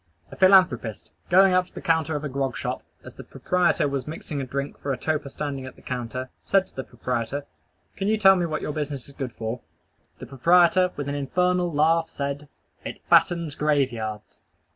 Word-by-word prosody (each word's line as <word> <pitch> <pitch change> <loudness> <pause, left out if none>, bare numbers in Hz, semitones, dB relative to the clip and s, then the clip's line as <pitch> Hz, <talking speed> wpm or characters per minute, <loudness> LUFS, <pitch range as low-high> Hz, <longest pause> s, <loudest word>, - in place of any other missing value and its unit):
A - - -9
philanthropist, 185 - +3 0.2
going 190 +1 +6
up 180 0 +2
to - - -25
the - - -5
counter 160 -1 +1
of 150 - -3
a - - -2
grog 135 0 -2
shop, - - -3 0.2
as - - -11
the - - -10
proprietor 180 -5 +1
was 140 -1 -3
mixing 150 -2 -5
a 130 - -5
drink 140 +2 -4
for 140 - -3
a 130 - -1
toper 150 +1 -2
standing 140 -2 -5
at 130 - -10
the - - -19
counter, 125 +1 -5
said 195 -1 +2
to - - -25
the 130 - -4
proprietor, 125 +3 -3 0.5
"Can 195 - -2
you 220 +1 +2
tell 195 -2 +7
me 175 -2 0
what 155 -1 -3
your 150 - -3
business 145 -3 -4
is 140 - -11
good 135 -3 -5
for?" 115 +2 -5 0.6
The 125 - -9
proprietor, 175 +7 +4
with 145 -1 -4
an 140 - -2
infernal 180 +5 0
laugh, 160 +2 +2
said, 140 +1 -4 0.3
"_It - - -7
fattens 170 -4 +4
graveyards! 130 -9 -1
145 Hz, 200 wpm, -25 LUFS, 130-175 Hz, 0.6 s, tell